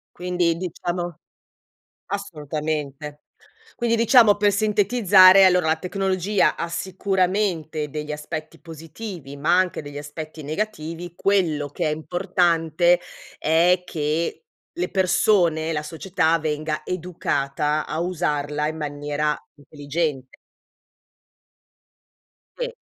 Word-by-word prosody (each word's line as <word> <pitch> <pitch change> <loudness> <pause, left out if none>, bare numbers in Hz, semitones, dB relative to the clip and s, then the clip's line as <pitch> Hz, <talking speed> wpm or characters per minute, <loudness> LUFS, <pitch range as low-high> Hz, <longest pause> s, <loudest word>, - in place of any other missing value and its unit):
Quindi, 175 -2 0
diciamo 175 -1 -4 0.9
assolutamente. 150 -5 -4 0.5
Quindi, 235 -1 0
diciamo, 230 -2 +6
per 205 0 +3
sintetizzare, 200 -2 +6
allora, 180 -2 +4
la 160 - +3
tecnologia 190 +2 0
ha 170 - -3
sicuramente 185 -4 -1
degli 150 +1 -5
aspetti 155 +1 -6
positivi, 165 - -9
ma 160 +5 +2
anche 185 -3 0
degli 145 0 -8
aspetti 155 +1 -8
negativi. 170 0 -4
Quello 170 -7 +1
che 160 +3 -2
è - - 0
importante 175 0 +1 0.4
è 175 +3 +3
che 160 - -2 0.3
le 355 - -2
persone 175 -4 +2
la 150 -1 -2
società 165 +1 0
venga 155 0 -2
educata 155 -4 -1
a - - -4
usarla 150 -4 -1
in 160 - -4
maniera 150 0 -2 0.2
intelligente. 145 -2 -4 2.2
Sì. - - -3
165 Hz, 100 wpm, -23 LUFS, 150-185 Hz, 2.2 s, diciamo